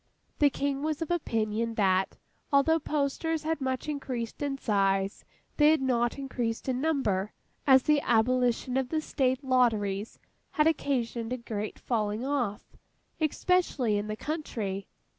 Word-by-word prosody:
The 290 - +6
King 280 0 -2
was 310 +1 -1
of 325 - -6
opinion, 225 -7 -1
that, 190 -2 +2 0.3
although 290 +4 +4
posters 300 +2 -1
had 320 -1 -1
much 260 +1 -2
increased 255 -6 -4
in 280 -1 -1
size, 195 -4 0 0.3
they 295 0 +6
had 315 0 +4
not 240 -2 +1
increased 245 -4 -3
in 255 -1 0
number; 215 -11 0 0.3
as 265 -1 +7
the 300 -1 +3
abolition 245 +1 +2
of 265 -2 0
the 315 - 0
State 265 -3 0
Lotteries 225 -6 +1 0.4
had 300 - +3
occasioned 250 -7 0
a 255 - -1
great 215 -3 -5
falling 215 0 -1
off, 250 -8 -2 0.4
especially 310 - +1
in 205 +1 -1
the 215 - -3
country. 220 -10 -4
255 Hz, 140 wpm, -29 LUFS, 220-290 Hz, 0.4 s, as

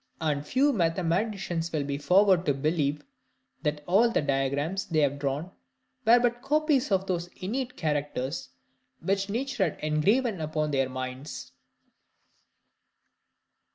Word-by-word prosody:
And 150 -3 0
few 270 - +2
mathematicians 175 -1 0
will 155 -3 -1
be 140 0 -3
forward 185 +3 +4
to 145 - +3
believe, 150 0 0 0.6
that 150 -1 -2
all 205 +7 +4
the 230 - 0
diagrams 140 +6 -1
they 155 -3 +1
have 145 -1 +1
drawn 145 +5 -2 0.5
were 235 +2 +7
but 240 0 0
copies 295 -3 +1
of 190 -1 +2
those 175 -2 -2
innate 250 +7 -3
characters 145 -2 -2 0.5
which 195 +1 -1
nature 255 +1 -1
had - - -12
engraven 190 +8 +1
upon 155 -1 -1
their 135 -2 +1
minds. 130 +2 -6
165 Hz, 125 wpm, -28 LUFS, 145-210 Hz, 0.6 s, were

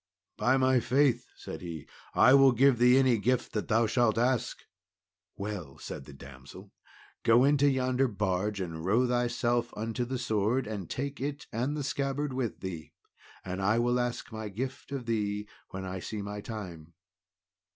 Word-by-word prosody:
"By 130 +2 +2
my 130 -1 +4
faith," 135 +2 +2
said - - -8
he, 85 -4 -7 0.3
"I 130 - +7
will 135 -2 +7
give 130 0 +4
thee 125 +1 +6
any 130 -4 +4
gift 125 +4 0
that 105 - -2
thou 115 +1 +3
shalt 115 -1 +2
ask." 125 +1 0 0.7
"Well," 100 -9 -6
said 70 - -7
the 70 - -11
damsel, 65 -1 -12 0.5
"go 115 +2 +5
into 145 0 +4
yonder 130 0 +1
barge, 100 -1 -1
and 80 -3 -5
row 110 +8 +3
thyself 120 -1 0
unto 115 +3 -2
the 130 +2 -3
sword, 115 +1 0
and 100 -6 -5
take 140 +1 -4
it 145 +1 -4
and 130 +7 -1
the 145 - -2
scabbard 140 +1 -2
with 125 -3 -3
thee, 85 -5 -6 0.5
and 95 +1 -4
I 105 +4 +2
will 120 +1 +2
ask 120 0 -3
my 110 -1 -5
gift 130 +7 -5
of 135 -3 -4
thee 105 -2 -1 0.2
when 95 0 -6
I 95 0 -4
see 105 +2 -5
my 105 0 -5
time." 85 -8 -8
115 Hz, 170 wpm, -29 LUFS, 100-130 Hz, 0.7 s, I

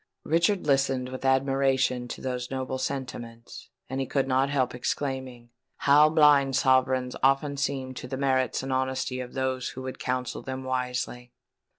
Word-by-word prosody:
Richard 170 +4 +1
listened 135 -2 +1
with 130 0 -7
admiration 135 -2 +2
to - - -7
these 125 -1 -3
noble 130 0 -3
sentiments; 120 -4 -6 0.2
and 130 +1 -3
he 135 - -3
could 135 +1 0
not 135 +1 +2
help 130 -3 0
exclaiming, 130 -1 -4 0.3
"How 150 +2 +5
blind 145 -4 +5
sovereigns 130 -1 +2
often 135 +2 +2
seem 135 -2 -2
to 125 - -7
the 130 +1 -4
merits 130 -2 +1
and 135 0 -2
honesty 130 0 -1
of 125 -1 -6
those 130 -1 -1
who 130 - -8
would 130 0 -6
counsel 125 -1 -2
them 130 0 -5
wisely!" 125 -1 -3
130 Hz, 160 wpm, -27 LUFS, 125-135 Hz, 0.3 s, How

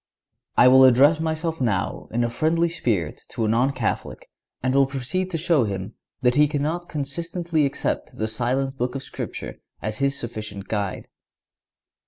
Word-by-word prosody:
I 125 - +8
will 130 +1 +8
address 135 +5 +6
myself 160 0 -2
now 100 -7 -1
in 120 +1 0
a 120 - 0
friendly 165 +6 +1
spirit 110 - -1
to 115 - -2
a - - +1
non 120 +5 +2
Catholic, 125 -5 -3 0.4
and 130 0 +1
will 135 0 +4
proceed 140 +8 -2
to 170 - -2
show 160 -6 +2
him 95 -2 -4 0.3
that 125 -1 +4
he 150 +3 +5
cannot 155 +4 -2
consistently 165 +2 -1
accept 135 - -3
the 110 - -1
silent 130 +4 -1
Book 125 +2 -1
of 135 - -4
Scripture - - -6 0.2
as 110 0 -4
his 140 0 +1
sufficient 110 -4 -6
guide. 100 -3 -3
135 Hz, 165 wpm, -24 LUFS, 115-155 Hz, 0.4 s, I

